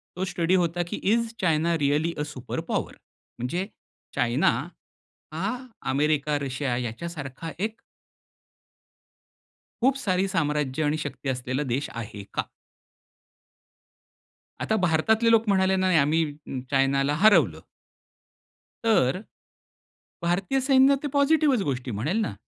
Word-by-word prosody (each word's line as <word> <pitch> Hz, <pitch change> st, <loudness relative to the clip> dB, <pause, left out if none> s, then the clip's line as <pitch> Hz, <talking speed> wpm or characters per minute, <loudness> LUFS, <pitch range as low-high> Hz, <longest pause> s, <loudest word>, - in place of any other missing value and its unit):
तो 180 Hz, -, -2 dB
स्टडी 175 Hz, 0 st, +1 dB
होता, 175 Hz, -1 st, +1 dB
की -, -, -4 dB, 0.2 s
is 230 Hz, -1 st, 0 dB
China 165 Hz, -1 st, +2 dB
रीयालि 150 Hz, +3 st, +1 dB
a, 150 Hz, -, -1 dB
super 130 Hz, -4 st, -6 dB
power? -, -, -1 dB, 0.5 s
म्हणजे 175 Hz, +11 st, -2 dB, 0.5 s
चायना 130 Hz, +7 st, +2 dB, 0.8 s
हा -, -, -1 dB, 0.3 s
अमेरिका, 150 Hz, +1 st, +1 dB
रशिया 135 Hz, -2 st, -2 dB
याच्यासारखा 140 Hz, +5 st, -5 dB
एक 220 Hz, +3 st, -3 dB, 2.0 s
खूप 265 Hz, +3 st, +4 dB
सारी 190 Hz, -6 st, 0 dB
साम्राज्य 150 Hz, -5 st, 0 dB
आणि 150 Hz, +1 st, +1 dB
शक्ती 135 Hz, -1 st, -5 dB
असलेला 130 Hz, +2 st, -2 dB
देश 140 Hz, +3 st, -2 dB
आहे 105 Hz, -3 st, -7 dB
का? -, -, +1 dB, 2.2 s
आता 220 Hz, -, +1 dB
भारतातले 220 Hz, +8 st, +3 dB
लोक 225 Hz, 0 st, +4 dB
म्हणाले 190 Hz, -1 st, +3 dB
नाही, 185 Hz, -2 st, +3 dB
आम्ही 155 Hz, +3 st, +3 dB, 0.5 s
चायनाला 135 Hz, +1 st, +2 dB
हरवलं. 140 Hz, -, +5 dB, 1.2 s
तर 185 Hz, -, +3 dB, 1.1 s
भारतीय 185 Hz, +10 st, +1 dB
सैन्य 270 Hz, 0 st, +6 dB
ते -, -, 0 dB
पॉझिटिव्हच 285 Hz, -3 st, +4 dB
गोष्टी 125 Hz, -2 st, -2 dB
म्हणेल 120 Hz, -, -1 dB
ना 120 Hz, -, -2 dB
160 Hz, 110 wpm, -26 LUFS, 135-190 Hz, 2.2 s, सैन्य